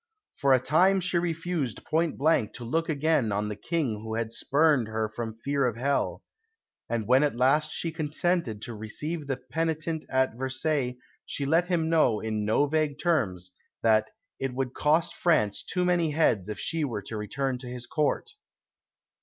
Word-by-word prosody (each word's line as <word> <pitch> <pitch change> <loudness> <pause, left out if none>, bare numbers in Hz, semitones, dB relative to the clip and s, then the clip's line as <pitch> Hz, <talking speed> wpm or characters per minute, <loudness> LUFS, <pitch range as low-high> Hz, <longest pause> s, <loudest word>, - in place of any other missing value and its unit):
For 140 - +2
a - - +3
time 185 +9 +3
she 180 -1 0
refused 165 - -2
point 160 0 0
blank 140 -7 +2
to 120 - -7
look 165 +8 -1
again 150 -6 +1
on 105 +1 -1
the 105 - -4
King 130 0 -1
who 110 0 -4
had 115 -1 -2
spurned 145 -1 +2
her 110 0 -1
from 110 0 -6
fear 140 -2 +2
of 120 - -2
hell; 140 +4 -1 0.7
and 115 -3 -1
when 130 +3 +5
at 145 -5 +1
last 135 +5 +3
she 165 - -2
consented 155 - -1
to 120 - -5
receive 145 +9 -5
the 135 -2 -1
penitent 160 +4 -2
at 130 -1 +2
Versailles 130 0 -1 0.3
she 140 - -3
let 165 +5 +3
him 170 -3 +1
know, 155 -10 +3
in 110 -1 -2
no 110 +7 +3
vague 150 -1 0
terms, 95 - 0 0.3
that 110 -1 +4 0.3
"it 135 -2 -3
would 130 -1 -2
cost 155 +3 +2
France 105 - +2
too 180 0 -1
many 175 -2 +2
heads 130 - +2
if 105 - -4
she 165 -1 -2
were 115 -8 -3
to 110 - -6
return 125 +5 -2
to 125 - -8
his 125 0 -6
Court." 150 - -1
140 Hz, 180 wpm, -27 LUFS, 115-160 Hz, 0.7 s, when